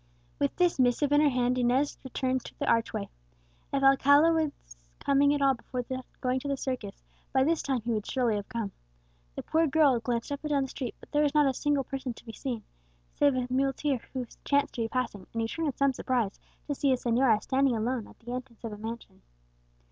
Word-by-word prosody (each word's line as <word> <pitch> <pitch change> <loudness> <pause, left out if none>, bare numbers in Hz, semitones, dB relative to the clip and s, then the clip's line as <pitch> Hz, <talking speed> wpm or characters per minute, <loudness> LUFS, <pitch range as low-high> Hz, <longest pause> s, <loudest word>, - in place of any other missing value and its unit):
With - - 0
this 355 -5 +2
missive 255 +3 +3
in 290 0 +5
her 300 - +5
hand 250 -1 +1
Inez 255 +4 +2
returned 260 -1 -1
to - - -11
the - - -2
archway. 225 -3 +1 0.6
If 275 0 0
Alcala 285 +4 +6
were 320 -2 +1 0.5
coming 280 +1 +3
at 290 -1 +1
all 270 -1 +5
before 250 0 -5 0.4
going 255 0 +1
to 285 - -6
the 280 -1 -1
circus, 250 -7 -4 0.3
by 265 -1 +3
this 325 +3 +2
time 265 -4 -1
he 235 - -1
would 215 -2 -2
surely 245 -4 +1
have 205 +2 -5
come. 230 -5 -3 0.6
The - - -5
poor 320 0 +2
girl 280 -4 +4
glanced 235 +2 -2
up 285 - -3
and 300 - -3
down 280 -2 +2
the 265 - -5
street; 255 -3 -5 0.2
there 295 - +2
was 295 0 +1
not 300 -1 +6
a 270 - +2
single 290 +1 +1
person 265 -3 -5
to - - -15
be 225 - -8
seen, 240 -4 -4 0.5
save 285 -2 +3
a 255 -1 0
muleteer 270 0 0
who 255 -2 -2 0.2
chanced 285 0 +1
to 235 - -3
be 225 - 0
passing, 225 -6 -3
and 230 - -1
who - - 0
turned 325 +7 -2
in 275 - -2
some 275 -1 +3
surprise 240 -5 -1 0.3
to 290 - -2
see 280 0 +1
a - - +5
señora 240 -2 +3
standing 270 -2 +2
alone 235 +1 -1
at - - -17
the 240 +1 -8
entrance 250 -2 -7
of 225 -2 -4
a - - -7
mansion. 225 +2 -8
260 Hz, 225 wpm, -29 LUFS, 235-280 Hz, 0.6 s, Alcala